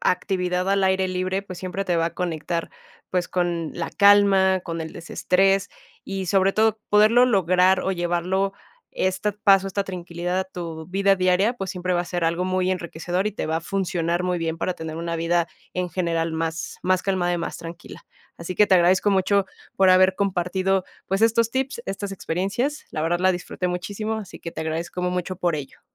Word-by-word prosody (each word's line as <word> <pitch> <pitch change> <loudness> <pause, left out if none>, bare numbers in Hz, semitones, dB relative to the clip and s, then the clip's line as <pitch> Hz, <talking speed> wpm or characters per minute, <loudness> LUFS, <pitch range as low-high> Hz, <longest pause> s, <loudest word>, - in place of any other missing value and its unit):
actividad 180 0 0
al 195 0 +2
aire 190 0 +2
libre, 185 +1 -2
pues, 185 -3 -9
siempre 185 +2 -4
te 180 - 0
va 165 0 +2
a 170 - -5
conectar, 170 -1 -3 0.4
pues, 180 -1 0
con 175 -3 -1
la - - -4
calma, 200 -2 +5
con 165 -1 -5
el 160 -1 -6
desestrés, 195 +3 +1 0.4
y 195 -1 -4
sobre 195 +2 +3
todo 220 0 +2
poderlo 215 +4 +6
lograr, 185 -4 +3
o 190 - -1
llevarlo 180 +2 0 0.4
este 190 +3 0
paso, 195 -1 +4
esta 200 +1 -2
tranquilidad 175 -1 -4
a - - -2
tu 165 -4 -7
vida 195 +1 +3
diaria, 185 +4 +3
pues, 195 -5 -4
siempre 180 0 -2
va 175 - +2
a - - -3
ser 175 -1 -2
algo 170 +2 0
muy 185 0 0
enriquecedor, 180 +1 -2
y 210 - -1
te - - -4
va 160 - 0
a - - -2
funcionar 175 -2 -1
muy 180 -1 0
bien 165 -1 -2
para 180 +1 -1
tener 160 -1 -6
una 170 0 -3
vida 165 +1 +1 0.3
en 180 0 -1
general 165 -2 -1
más 165 0 -3
más 185 0 +2
calmada 185 -3 0
y 175 - 0
más 170 - -4
tranquila. 170 +1 -10 0.3
Así 170 +2 -5
que 210 - +5
te 190 - +4
agradezco 185 +3 +4
mucho 195 +1 +2 0.3
por 190 -1 +5
haber 185 +1 +5
compartido, 190 0 0 0.2
pues, 195 +1 -1
estos 230 0 +3
tips, 260 -1 -2
estas 195 +1 -4
experiencias. 195 - -2
La 155 - -3
verdad 170 +2 0
la 185 0 +4
disfruté 180 0 -3
muchísimo, 200 +5 -3
así 210 -5 -7
que 165 - -7
te - - -7
agradezco 165 +3 -3
mu 180 - 0
mucho 180 0 -3
por 175 -3 0
ello. 145 -3 -8
185 Hz, 195 wpm, -23 LUFS, 175-195 Hz, 0.4 s, poderlo